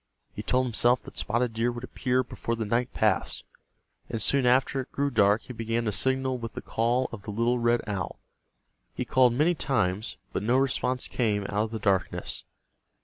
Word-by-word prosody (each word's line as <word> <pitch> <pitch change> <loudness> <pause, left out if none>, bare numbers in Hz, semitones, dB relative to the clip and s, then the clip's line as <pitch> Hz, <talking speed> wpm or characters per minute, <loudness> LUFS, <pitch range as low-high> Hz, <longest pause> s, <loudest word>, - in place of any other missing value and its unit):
He 105 - -5
told 125 +4 +1
himself 120 +1 +2
that - - -12
Spotted 120 0 0
Deer 115 +2 +1
would 120 0 -7
appear 125 0 0
before 115 -1 -4
the 115 -1 -3
night 120 +4 0
passed, 105 -3 0 0.7
and 115 - -2
soon 130 +4 +2
after 130 +2 +3
it 130 - -11
grew 140 0 0
dark 105 -2 +3
he 125 - -8
began 115 0 -2
to 105 - +1
signal 130 +3 +1
with 115 -1 -6
the - - -6
call 120 +3 +1
of 115 - -7
the 105 - -9
little 115 +4 +1
red 120 0 +2
owl. 100 -4 -4 0.8
He - - -2
called 130 -2 +4
many 155 +8 +3
times, 110 - -1 0.2
but - - -1
no 120 +5 +2
response 130 -1 0
came 105 -4 0
out 105 +2 0
of - - -7
the 110 - -4
darkness. 100 -3 0
120 Hz, 195 wpm, -27 LUFS, 110-130 Hz, 0.8 s, called